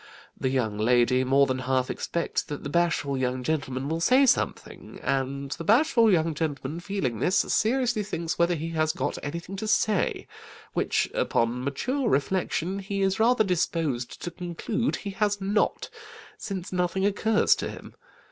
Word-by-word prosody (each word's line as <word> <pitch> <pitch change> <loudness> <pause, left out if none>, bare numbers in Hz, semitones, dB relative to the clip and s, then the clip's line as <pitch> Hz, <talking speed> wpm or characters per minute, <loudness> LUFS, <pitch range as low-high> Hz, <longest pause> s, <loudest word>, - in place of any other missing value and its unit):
The 130 - -1
young 110 -6 -1
lady 125 +3 +3
more 135 +2 +4
than 130 -1 -2
half 130 0 0
expects 170 - -2
that 145 -2 -6
the 140 - -5
bashful 170 -4 +1
young 130 -1 -1
gentleman 135 -3 -2
will 160 +2 -1
say 255 +9 +5
something, 250 - -1
and 135 +1 -2
the 165 - -4
bashful 230 - +4
young 165 -3 +2
gentleman 150 0 -3
feeling 175 - -3
this, 185 - +1
seriously 245 0 +1
thinks 170 -5 -4
whether 170 +1 +3
he 160 +1 -4
has 155 -1 0
got 135 +2 -3
anything 170 +5 -5
to 215 - -4
say, 215 -2 +1 0.5
which, - - +1
upon 120 +2 0
mature 240 - -1
reflection, 185 +4 0
he 195 0 -2
is 190 +1 +1
rather 230 0 +4
disposed 165 - -1
to 175 - -4
conclude 180 +8 -2
he 200 - -6
has 205 0 0
not, 200 +2 0 0.5
since 190 -3 -6
nothing 180 +2 0
occurs 210 +2 +3
to - - -3
him. - - -10
170 Hz, 160 wpm, -26 LUFS, 135-200 Hz, 0.5 s, say